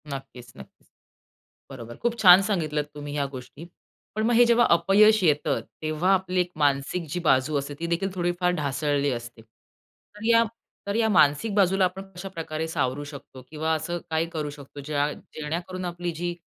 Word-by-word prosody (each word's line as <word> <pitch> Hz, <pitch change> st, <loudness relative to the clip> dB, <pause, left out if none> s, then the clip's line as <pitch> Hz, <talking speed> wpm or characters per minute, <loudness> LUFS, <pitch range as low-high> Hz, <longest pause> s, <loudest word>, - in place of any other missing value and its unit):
नक्कीच, 135 Hz, -4 st, -8 dB
नक्कीच. -, -, -15 dB, 0.8 s
बरोबर. 120 Hz, -3 st, -9 dB
खूप 235 Hz, 0 st, -1 dB
छान 185 Hz, -3 st, +8 dB
सांगितलत 155 Hz, -8 st, -1 dB
तुम्ही 145 Hz, -1 st, -7 dB
ह्या 145 Hz, -1 st, 0 dB
गोष्टी. 130 Hz, +4 st, -10 dB, 0.5 s
पण 215 Hz, -, -1 dB
मग 240 Hz, -, +2 dB
हे 240 Hz, +1 st, +6 dB
जेव्हा 235 Hz, 0 st, +4 dB
अपयश 195 Hz, +5 st, +5 dB
येतं, 150 Hz, -3 st, +2 dB, 0.2 s
तेव्हा 155 Hz, +5 st, +1 dB
आपली 185 Hz, -1 st, 0 dB
एक 180 Hz, 0 st, -4 dB
मानसिक 145 Hz, +4 st, 0 dB
जी 175 Hz, -, -3 dB
बाजू 135 Hz, 0 st, +2 dB
असते 140 Hz, +1 st, -6 dB
ती 170 Hz, -, -3 dB
देखील 170 Hz, +3 st, -1 dB
थोडीफार 175 Hz, 0 st, 0 dB
ढासळली 145 Hz, -1 st, 0 dB
असते. 120 Hz, -1 st, -7 dB
तर 115 Hz, -, -18 dB
या, 230 Hz, 0 st, +5 dB, 0.4 s
तर 200 Hz, -, -1 dB
या 225 Hz, -1 st, +2 dB
मानसिक 185 Hz, +2 st, +3 dB
बाजूला 190 Hz, -1 st, +3 dB
आपण 185 Hz, +2 st, -4 dB
कशाप्रकारे 165 Hz, -4 st, -5 dB
सावरू 140 Hz, -3 st, -2 dB
शकतो? 140 Hz, -2 st, -11 dB
किंवा 160 Hz, +1 st, -1 dB
असं 160 Hz, +3 st, -2 dB
काही 160 Hz, +1 st, 0 dB
करू 155 Hz, -3 st, -4 dB
शकतो 145 Hz, 0 st, -11 dB
ज्या 145 Hz, 0 st, 0 dB
जेणेकरून 175 Hz, +4 st, -6 dB
आपली 175 Hz, 0 st, -4 dB
जी 175 Hz, +1 st, -4 dB
160 Hz, 165 wpm, -25 LUFS, 145-185 Hz, 0.8 s, छान